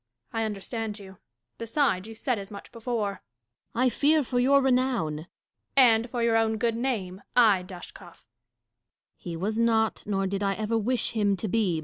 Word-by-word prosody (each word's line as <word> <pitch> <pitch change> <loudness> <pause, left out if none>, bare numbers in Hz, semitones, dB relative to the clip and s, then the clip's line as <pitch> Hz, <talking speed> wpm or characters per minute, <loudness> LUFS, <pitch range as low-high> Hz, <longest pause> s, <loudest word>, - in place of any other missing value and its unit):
I 225 0 0
understand 215 +1 -4
you: 190 -3 -13 0.4
beside, 230 -5 0
you 225 - -9
said 240 0 -1
as 195 - -8
much 200 -1 -10
before. 225 -4 -3 0.5
Dashkof. - - -52
I 255 - +5
fear 300 +4 +3
for 245 0 -1
your 275 +3 +5
renown. 250 - +1
Catharine. 155 +4 -10 0.5
And 235 -2 +5
for 240 -1 -2
your 230 -1 +3
own 220 0 +1
good 230 0 0
name 210 -7 -2
— - - -44
ay, 215 -6 +5
Dashkof 180 +1 -10
1 180 - -12
Dashkof. - - -25 0.9
He 170 -2 -7
was 215 +6 -2
not, 225 -1 +2
nor 195 -2 0
did 195 +1 -2
I 195 -1 +1
ever 215 +2 -2
wish 235 +3 0
him 205 -3 +1
to 200 - -3
be. 190 -6 +1
220 Hz, 195 wpm, -27 LUFS, 195-240 Hz, 0.9 s, I